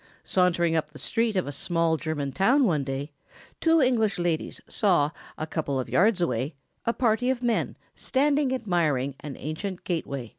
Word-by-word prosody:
Sauntering 175 -3 +2
up 155 -2 0
the 150 - -13
street 225 +3 0
of 185 - +1
a 145 - -4
small 165 +3 +1
German 155 -3 -3
town 245 - +3
one 160 - +2
day, 135 +2 -4 0.5
two 330 0 +4
English 220 -6 +2
ladies 175 -2 -1
saw, 170 -8 +2 0.3
a 155 - -3
couple 150 -4 -2
of 130 - -2
hundred - - -11
yards 200 0 +4
away, 130 -1 -1 0.3
a 230 - +3
party 245 0 +1
of 255 -1 -1
men 235 -2 0 0.2
standing 280 0 +1
admiring 170 - 0
an 145 -3 -7
ancient 175 +5 -5
gateway. 140 -8 -3
175 Hz, 175 wpm, -26 LUFS, 150-225 Hz, 0.5 s, two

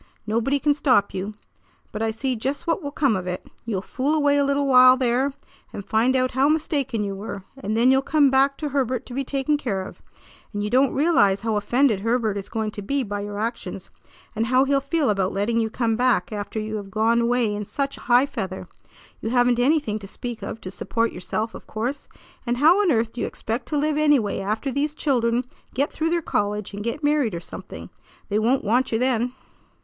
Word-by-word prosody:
Nobody 230 +6 +1
can 290 +1 +2
stop 260 -8 +2
you. 200 +3 -4 0.6
But 215 - -5
I 225 - +1
see 255 +4 -2
just 270 +7 -3
what 335 +2 0
will 285 - -4
come 275 -5 +1
of 185 -1 -4
it. 180 0 -4 0.2
You'll 200 -5 -2
fool 275 +8 -1
away 285 -2 +3
a - - +3
little 280 0 +1
while 255 -1 +7
there, 255 +2 +1 0.4
and 200 - -7
find 235 +4 +2
out 255 0 +2
how 265 +3 +2
mistaken 280 -7 0
you 200 -1 -3
were; 200 -1 -6
and 220 -5 -3
then 245 +3 +5
you'll 265 0 +4
come 285 -1 +3
back 275 +1 +3
to 300 - -3
Herbert 260 -3 -1
to 245 - -10
be 275 +2 -1
taken 275 +2 0
care 205 -10 -2
of. - - -11 0.5
And 205 0 -2
you 210 - -3
don't 260 +2 +4
realize 265 - +3
how 225 -1 -1
offended 225 +2 +2
Herbert 225 0 0
is 200 -1 -5
going 220 -2 -2
to 205 - -7
be 275 +7 -1
by 205 -2 -4
your 205 0 -5
actions, 225 +3 -4 0.4
and 225 +1 0
how 255 +2 +4
he'll 275 0 +2
feel 280 -2 +1
about 195 -2 0
letting 215 +4 0
you 225 -1 0
come 225 0 0
back 235 -6 +1
after 210 +1 -4
you 215 0 -3
have 200 -2 -7
gone 225 +3 +2
away 235 -2 +1
in 205 0 -3
such 275 +6 -3
high 245 +2 +3
feather. 190 -9 -5 0.5
You 225 - -2
haven't 245 0 +3
anything 250 -5 +1
to 200 - -9
speak 240 +3 -6
of - - -6
to 185 - -7
support 230 +4 -1
yourself, 215 +4 -3
of - - -11
course, 245 +6 -4 0.4
and 240 -1 -1
how 330 +9 +5
on 380 -5 +3
earth 225 -3 +1
do 245 - -5
you - - 0
expect 230 +3 -4
to 300 - -1
live 300 +1 +1
anyway 290 -9 +2
after 215 +7 -2
these 290 +3 -1
children 245 -5 +1 0.3
get 280 +3 0
through 320 +1 -1
their 340 0 0
college 210 -3 -2
and 205 +1 -5
get 235 +7 -3
married 290 - +2
or - - -3
something? - - -9 0.4
They 210 +1 +1
won't 245 +5 +2
want 245 +5 +1
you 225 - +2
then." 250 0 0
240 Hz, 220 wpm, -23 LUFS, 215-275 Hz, 0.6 s, while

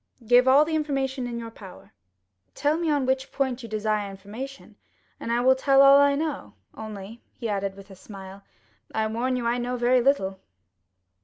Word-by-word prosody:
"Give 245 +3 +5
all 280 +3 +6
the 320 - -4
information 270 -4 -2
in 235 -1 -5
your 230 -1 -7
power." 195 -4 -14 0.6
"Tell 295 +1 +1
me 335 0 -1
on 290 -3 +1
which 265 +1 -1
point 265 -2 -2
you 230 - -9
desire 215 -1 -1
information, 215 +8 -9 0.4
and 230 - -4
I 240 +1 +1
will 260 +1 +5
tell 270 +1 +4
all 275 0 +8
I 285 0 +4
know; 300 -1 -4 0.2
only," 215 +1 -9 0.3
added 200 -2 -2
he, - - -21
with 195 0 -13
a - - -11
smile, 195 0 -11 0.5
"I 220 0 +1
warn 235 +4 -1
you 245 -2 -3
I 240 +1 0
know 245 +1 -3
very 245 +1 +3
little." 195 -8 +1
245 Hz, 185 wpm, -25 LUFS, 215-270 Hz, 0.6 s, all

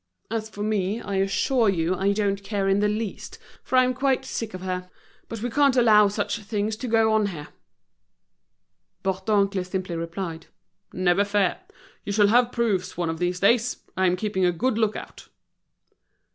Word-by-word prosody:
As 220 -1 -3
for 205 -1 -6
me, 210 0 -1
I 200 -4 -4
assure 215 +4 +2
you 170 -2 0
I 195 +2 +1
don't 200 -1 -1
care 195 -1 -2
in 195 +1 +3
the 210 - +2
least, 210 -1 -4 0.2
for 260 - 0
I'm 255 0 +4
quite 265 0 0
sick 225 -6 -4
of 185 - -8
her. 180 -1 -4 0.4
But 225 -1 -6
we 245 - -1
can't 280 0 +3
allow 215 -4 +6
such 205 +3 -2
things 210 0 -2
to 255 - -5
go 225 -1 +3
on 215 -1 +2
here." 155 -6 -7 1.5
Bourdoncle 195 0 +1
simply 185 -1 -4
replied: 165 0 -5 0.4
"Never 185 +1 +2
fear, 200 -2 0 0.4
you - - -4
shall 205 0 +4
have 245 +2 +4
proofs 215 -9 -1
one 170 -2 -1
of 160 - -6
these 180 0 -1
days. 235 +4 +3 0.2
I'm 185 -1 +2
keeping 190 -1 -2
a 180 - +4
good 230 +9 0
look 215 -1 +1
out." - - -9
205 Hz, 175 wpm, -24 LUFS, 185-225 Hz, 1.5 s, allow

